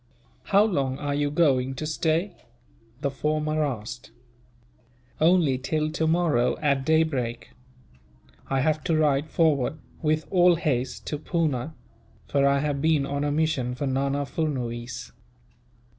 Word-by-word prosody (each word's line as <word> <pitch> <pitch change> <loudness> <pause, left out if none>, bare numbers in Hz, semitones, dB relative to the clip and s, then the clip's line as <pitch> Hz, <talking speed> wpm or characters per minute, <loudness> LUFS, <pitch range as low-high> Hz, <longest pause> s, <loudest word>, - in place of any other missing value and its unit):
"How 200 +1 +4
long 140 -11 0
are 145 0 -3
you 145 0 0
going 135 -4 +2
to 155 - -4
stay?" 160 +4 0 0.7
the 140 -2 0
former 155 +3 -1
asked. 120 -4 -5 1.1
"Only 160 -5 +3
till 155 +3 -1
tomorrow, 160 -6 +1
at 140 -3 +1
daybreak. 140 -7 0 1.0
I 135 -1 +1
have 155 +1 0
to 165 -3 +2
ride 150 -1 +2
forward, 155 -3 +1 0.2
with 155 -1 +1
all 180 -1 +5
haste, 135 -6 -2
to 150 - -3
Poona; 155 -4 -1 0.5
for 140 -1 +2
I 140 0 +2
have 145 -2 -1
been 155 -2 +2
on 140 +1 -2
a 145 - 0
mission 145 -5 0
for 140 - -3
Nana 140 +1 0
Furnuwees." 125 -6 -4
145 Hz, 130 wpm, -25 LUFS, 135-160 Hz, 1.1 s, all